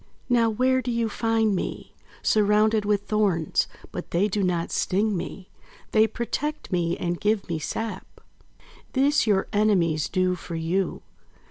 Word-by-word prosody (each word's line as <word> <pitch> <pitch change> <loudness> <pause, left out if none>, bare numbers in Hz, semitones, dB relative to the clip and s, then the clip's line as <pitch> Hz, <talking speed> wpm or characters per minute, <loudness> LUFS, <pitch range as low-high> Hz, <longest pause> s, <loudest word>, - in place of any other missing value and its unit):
"Now, 235 -2 +4
where 255 +4 +2
do 250 - -4
you 230 -1 0
find 225 -1 +1
me? - - -5 0.3
Surrounded 215 0 +3
with 205 -1 +2
thorns! 200 -8 +1 0.2
But - - -6
they 185 +5 +2
do 210 0 -1
not 175 -3 0
sting 205 +2 +1
me. 185 +2 -6 0.4
They 220 0 +5
protect 290 +7 -4
me 175 -1 0
and 175 -1 -3
give 210 -1 +1
me 165 -2 -2
sap. 205 +5 -5 0.7
This 275 -1 +3
your 195 -2 +3
enemies 180 -8 +2
do 185 0 +1
for 175 -1 -6
you. 170 +3 -1
205 Hz, 145 wpm, -25 LUFS, 180-225 Hz, 0.7 s, They